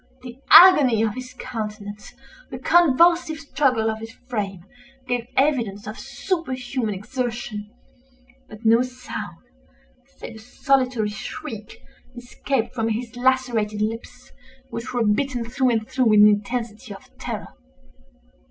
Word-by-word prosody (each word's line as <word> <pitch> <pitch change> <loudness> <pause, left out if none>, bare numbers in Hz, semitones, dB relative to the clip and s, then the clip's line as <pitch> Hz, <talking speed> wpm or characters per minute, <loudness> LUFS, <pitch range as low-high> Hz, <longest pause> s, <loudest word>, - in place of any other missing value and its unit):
The 250 0 -10
agony 285 - +8
of 220 -2 0
his 255 +1 -9
countenance, 210 -3 -7 0.3
the - - -6
convulsive 340 0 +4
struggle 270 -7 0
of 220 0 -2
his 225 +1 -8
frame, 205 -7 -5 0.4
gave 245 -1 -2
evidence 235 -8 +1
of 215 +2 -7
superhuman 255 - -3
exertion: 220 -1 -5 0.8
but 215 +2 -13
no 230 +2 +5
sound, 255 0 -6 0.8
save 225 - -9
a - - -12
solitary 250 -1 0
shriek, 215 +1 -8 0.3
escaped 245 0 -3
from 225 -2 -1
his 230 +2 -4
lacerated 245 -4 0
lips, 225 +2 -6 0.4
which 235 +3 -5
were 240 -2 0
bitten 245 +3 0
through 255 +1 +1
and 225 -2 0
through 250 -5 +2
in 210 0 +7
the 210 - +8
intensity 215 +1 -3
of - - -17
terror. - - -5
240 Hz, 125 wpm, -23 LUFS, 215-255 Hz, 0.8 s, agony